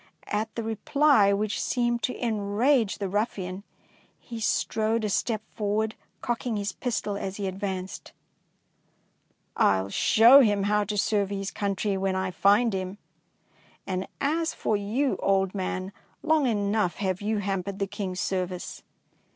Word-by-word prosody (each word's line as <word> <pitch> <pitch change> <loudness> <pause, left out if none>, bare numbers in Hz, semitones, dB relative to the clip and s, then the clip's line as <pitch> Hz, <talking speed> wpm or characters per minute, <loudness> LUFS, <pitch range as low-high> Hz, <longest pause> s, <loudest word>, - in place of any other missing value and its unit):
At 215 +1 -2
the 230 - -3
reply, 225 0 +3
which 205 +1 -1
seemed 240 -1 0
to 250 - -2
enrage 220 +2 +1
the 200 - -3
ruffian, 195 -2 -2 0.6
he 230 -1 -8
strode 220 +1 0
a - - -1
step 215 +2 -1
forward, 215 +1 -1 0.3
cocking 240 -1 -2
his 200 0 -2
pistol 220 -5 -2
as 195 -1 -5
he 200 - -3
advanced. 190 -1 -5 1.5
"141 95 0 +2
show 235 - +7
him 205 -5 +2
how 210 +1 +2
to 210 +1 -3
serve 200 -1 +1
his 195 -1 -3
country 200 0 -1
when 190 0 0
I 190 0 -1
find 205 +5 +3
him, 190 +1 -4 0.9
and 185 0 -3
as 320 +3 0
for 215 - 0
you, 220 +8 0
old 195 -1 +2
man, 185 -1 -3 0.3
long 315 -3 +3
enough 205 -4 0
have 190 -2 -2
you 215 +1 0
hampered 195 -1 -2
the 200 - 0
King's 195 -2 -5
service." 185 -1 -3
205 Hz, 145 wpm, -26 LUFS, 195-225 Hz, 1.5 s, show